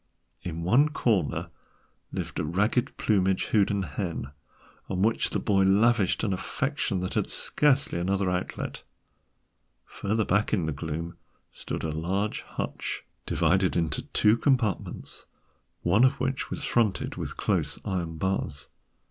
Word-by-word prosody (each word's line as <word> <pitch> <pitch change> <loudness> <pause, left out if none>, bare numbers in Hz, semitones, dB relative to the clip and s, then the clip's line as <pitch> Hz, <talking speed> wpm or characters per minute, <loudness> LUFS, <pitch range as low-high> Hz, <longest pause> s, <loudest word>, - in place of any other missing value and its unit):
In 85 -1 -4
one 130 - +4
corner 105 - 0 0.6
lived - - -4
a - - 0
ragged 100 +10 0
plumaged 95 -3 +2
Houdan 100 -2 +3
hen, 85 -7 -4 0.6
on 95 0 0
which 110 +1 +2
the - - -1
boy 100 -2 +2
lavished 105 +1 +3
an 100 -4 +1
affection 115 -1 -1
that 90 - -3
had - - 0
scarcely 140 -10 +2
another 95 +2 0
outlet. 90 0 -3 1.0
Further 110 +2 -1
back 105 +3 +1
in 90 -7 +2
the 80 - -1
gloom 80 +4 -4 0.3
stood - - -5
a 80 - -1
large 95 +7 -1
hutch, - - -4 0.2
divided 95 0 +2
into 80 -3 0
two 105 +2 +4
compartments, 120 - -1 0.6
one 100 +7 +4
of 130 +1 +4
which 130 +1 -1
was - - -4
fronted 110 -5 +1
with - - -5
close - - 0
iron 85 -4 -2
bars. 75 -7 -2
95 Hz, 135 wpm, -27 LUFS, 85-110 Hz, 1.0 s, one